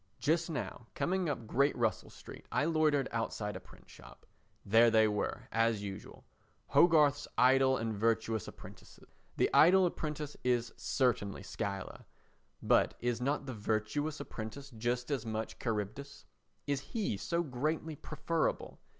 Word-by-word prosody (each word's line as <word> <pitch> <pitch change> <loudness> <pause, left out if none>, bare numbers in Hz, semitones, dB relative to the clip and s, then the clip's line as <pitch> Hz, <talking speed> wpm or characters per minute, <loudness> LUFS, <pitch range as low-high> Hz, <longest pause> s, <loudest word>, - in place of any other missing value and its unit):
Just 165 +3 +1
now 125 -6 -5
coming 185 -2 0
up 125 -5 -3
Great 140 +6 +2
Russell 115 -3 0
Street - - -12
I - - +1
loitered 155 -4 +2
outside 110 -3 -3
a - - -5
print - - -18
shop. - - -15 0.4
There 115 +3 +6
they 110 -1 +5
were 105 -1 -2
as 115 -2 +1
usual—Hogarth's 145 - +1
Idle 130 +1 +5
and 115 0 -2
Virtuous 110 0 0
Apprentices. - - -13 0.3
The - - +2
idle 185 +4 +7
apprentice 150 -3 -3
is 120 -2 0
certainly 120 -7 0
Scylla, 100 -1 -5 0.6
but - - +3
is 120 -1 -1
not 140 +2 -1
the 130 - -5
virtuous 110 +8 -2
apprentice 135 +6 -7
just 120 +3 -2
as 135 -5 -1
much 110 -1 -4
Charybdis? 115 +5 -4 0.4
Is 140 -1 -1
he 210 - -2
so 170 - -1
greatly 155 +3 -2
preferable? 155 +2 -2
125 Hz, 135 wpm, -33 LUFS, 110-150 Hz, 0.6 s, idle